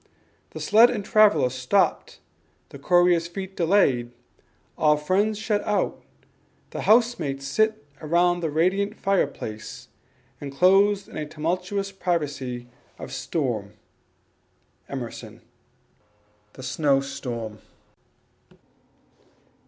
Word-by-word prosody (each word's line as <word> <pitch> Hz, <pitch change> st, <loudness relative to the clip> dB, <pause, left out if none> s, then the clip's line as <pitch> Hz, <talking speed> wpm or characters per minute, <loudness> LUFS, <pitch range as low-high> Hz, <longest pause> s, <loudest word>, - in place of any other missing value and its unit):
The -, -, -9 dB
sled 225 Hz, +3 st, +6 dB
and 210 Hz, -4 st, -3 dB
traveller 200 Hz, -12 st, +4 dB
stopped, 130 Hz, +10 st, 0 dB, 0.5 s
the -, -, -11 dB
courier's 175 Hz, -1 st, +3 dB
feet 190 Hz, +2 st, -7 dB
Delayed, 160 Hz, -10 st, +2 dB, 0.7 s
all 150 Hz, -1 st, +3 dB
friends 200 Hz, +8 st, 0 dB
shut 215 Hz, -1 st, -1 dB
out, 210 Hz, -1 st, -1 dB, 0.7 s
the -, -, -5 dB
housemates 215 Hz, -, +2 dB
sit 215 Hz, +4 st, 0 dB, 0.2 s
Around 175 Hz, +3 st, +2 dB
the 165 Hz, -2 st, -2 dB
radiant 190 Hz, +7 st, 0 dB
fireplace, 140 Hz, -, -3 dB, 0.5 s
enclosed 195 Hz, +8 st, +3 dB
In -, -, -10 dB
a 155 Hz, -1 st, -4 dB
tumultuous 180 Hz, +6 st, -3 dB
privacy 145 Hz, -10 st, -3 dB, 0.3 s
of -, -, -8 dB
storm." 115 Hz, -10 st, -3 dB, 1.2 s
Emerson. 125 Hz, -4 st, -7 dB, 1.1 s
The 130 Hz, -, -11 dB
Snow 135 Hz, +1 st, +1 dB
Storm. 120 Hz, -6 st, -6 dB
170 Hz, 95 wpm, -24 LUFS, 135-200 Hz, 1.2 s, sled